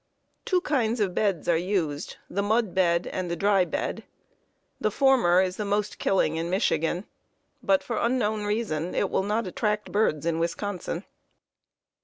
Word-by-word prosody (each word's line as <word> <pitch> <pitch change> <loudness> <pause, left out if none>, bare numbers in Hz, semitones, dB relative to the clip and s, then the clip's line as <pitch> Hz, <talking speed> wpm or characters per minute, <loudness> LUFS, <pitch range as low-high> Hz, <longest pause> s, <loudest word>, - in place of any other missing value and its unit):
Two 365 -2 +2
kinds 245 -8 0
of 195 -4 0
beds 195 -6 0
are 170 - +4
used, 165 -4 -2
the 200 - -2
"mud" 215 -1 +1
bed 175 -2 +2
and 185 -1 -3
the 170 - -1
"dry" 195 +1 +3
bed. - - -3 0.8
The - - +1
former 240 -10 +4
is 185 0 -3
the 210 - -2
most 205 +1 -1
killing 160 -5 +1
in 165 +1 -2
Michigan, 180 -1 0 0.6
but, 195 -1 +2
for 235 - -3
unknown 220 -3 0
reason, 205 -6 -2
it 195 - 0
will - - +2
not 210 +3 -1
attract 210 +3 -2
birds 185 -8 +1
in 165 -1 0
Wisconsin. 175 +1 -3
195 Hz, 160 wpm, -26 LUFS, 175-215 Hz, 0.8 s, are